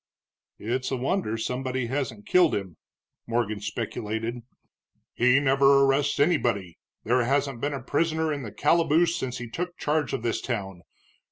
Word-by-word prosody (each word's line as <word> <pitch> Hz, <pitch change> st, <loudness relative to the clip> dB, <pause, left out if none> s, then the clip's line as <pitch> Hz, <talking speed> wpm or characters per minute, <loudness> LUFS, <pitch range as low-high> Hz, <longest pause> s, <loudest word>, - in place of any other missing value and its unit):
"It's 125 Hz, +4 st, -2 dB
a 130 Hz, -, -1 dB
wonder 125 Hz, -, -1 dB
somebody 130 Hz, +2 st, -2 dB
hasn't 120 Hz, -5 st, -3 dB
killed 180 Hz, -3 st, +4 dB
him," 95 Hz, -5 st, -5 dB, 0.5 s
Morgan 115 Hz, -3 st, -1 dB
speculated. 110 Hz, +2 st, -3 dB, 0.8 s
"He 125 Hz, +3 st, +4 dB
never 140 Hz, 0 st, +4 dB
arrests 140 Hz, +2 st, +1 dB
anybody, 120 Hz, -, +1 dB, 0.2 s
there 125 Hz, +2 st, +2 dB
hasn't 135 Hz, -1 st, 0 dB
been 145 Hz, 0 st, -1 dB
a 135 Hz, -, -7 dB
prisoner 160 Hz, +2 st, 0 dB
in 145 Hz, -, -4 dB
the 110 Hz, -5 st, -7 dB
calaboose 165 Hz, +7 st, +3 dB
since 130 Hz, -7 st, -3 dB
he 120 Hz, -1 st, -6 dB
took 175 Hz, +9 st, -5 dB
charge 150 Hz, -1 st, 0 dB
of 125 Hz, -, -3 dB
this 115 Hz, -1 st, -1 dB
town. 95 Hz, -7 st, -4 dB
130 Hz, 150 wpm, -26 LUFS, 115-145 Hz, 0.8 s, killed